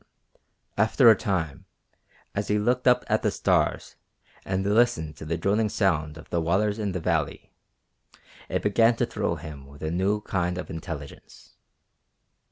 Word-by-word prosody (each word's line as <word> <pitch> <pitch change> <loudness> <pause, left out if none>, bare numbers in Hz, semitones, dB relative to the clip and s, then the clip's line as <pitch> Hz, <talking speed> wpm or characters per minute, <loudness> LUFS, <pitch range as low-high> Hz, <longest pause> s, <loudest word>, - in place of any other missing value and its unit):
After 115 +3 +6
a - - +5
time, 90 -4 -3 0.7
as 100 0 -2
he 105 - +2
looked 125 +4 +1
up 125 - +5
at - - +1
the - - +2
stars - - 0 0.5
and 95 0 -2
listened 105 -8 +2
to 75 - -8
the 85 +2 -2
droning 105 +5 +1
sound 80 -7 0
of 80 - -12
the 85 - +1
waters 100 +6 +1
in 100 -3 -2
the 90 - -2
valley, 80 - -2 1.0
it - - -1
began 115 +3 +4
to 120 - +1
thrill 105 -7 -2
him 75 -4 -9
with 70 +2 -13
a 80 - -2
new 95 +4 0
kind 90 -3 -1
of 90 - -6
intelligence. 80 -4 -9
95 Hz, 160 wpm, -26 LUFS, 80-105 Hz, 1.0 s, After